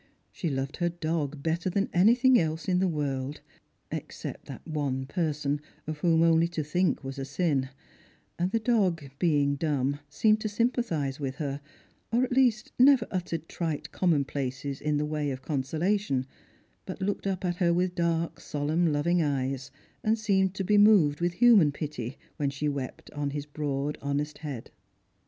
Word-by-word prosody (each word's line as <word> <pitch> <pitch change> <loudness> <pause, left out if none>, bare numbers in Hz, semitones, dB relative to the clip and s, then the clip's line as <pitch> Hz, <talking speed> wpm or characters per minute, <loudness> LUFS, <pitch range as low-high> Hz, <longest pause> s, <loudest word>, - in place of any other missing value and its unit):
She 170 - -3
loved 135 +1 -3
her 175 -1 +1
dog 155 -4 -3
better 165 +3 0
than 195 +2 0
anything 240 +7 +5
else 160 0 -2
in 180 -1 +2
the 190 - +2
world 145 -3 -2 0.3
— - - -44
except - - -6
that - - -9
one 140 -4 -2
person 150 -2 -1 0.2
of 155 -1 -5
whom 165 0 +3
only 165 0 +4
to 165 -2 -3
think 175 +2 0
was 135 +1 -6
a - - -2
sin 140 -3 0 0.3
— - - -33
and 175 +1 +1
the 230 - +1
dog, 205 - +1 0.2
being 145 -5 +3
dumb, 145 -2 0
seemed 215 +8 +3
to 215 - -1
sympathise 205 - 0
with 135 -2 -3
her, 140 -1 -3 0.5
or 240 +2 +3
at 260 - -2
least 245 -4 +2
never 260 -2 +6
uttered 170 -4 -3
trite 160 -4 -3
commonplaces 140 -5 -1
in 150 -1 +1
the 150 - 0
way 150 -1 -1
of 130 -1 -5
consola 160 +8 0
tion, 135 -10 -1 0.6
but - - -6
looked 200 +1 -2
up 190 -1 -2
at 175 -1 -1
her 175 -2 +3
with 180 +1 +1
dark 170 -2 -1
solemn 155 +3 0
loving 170 +4 +2
eyes, 135 -2 -1 0.3
and 220 +1 +2
seemed 195 -3 +1
to 195 - -2
be 205 +2 +4
moved 185 -8 +5
with 175 0 +1
human 210 -8 +6
pity, 145 -4 -5 0.2
when 145 -2 0
she 140 +2 -3
wept 140 -3 -4
upon 145 -1 -3
hig 145 +1 -6
broad 145 -1 -2
honest 145 +2 -2
head. 140 -7 -6
155 Hz, 175 wpm, -28 LUFS, 145-185 Hz, 0.6 s, never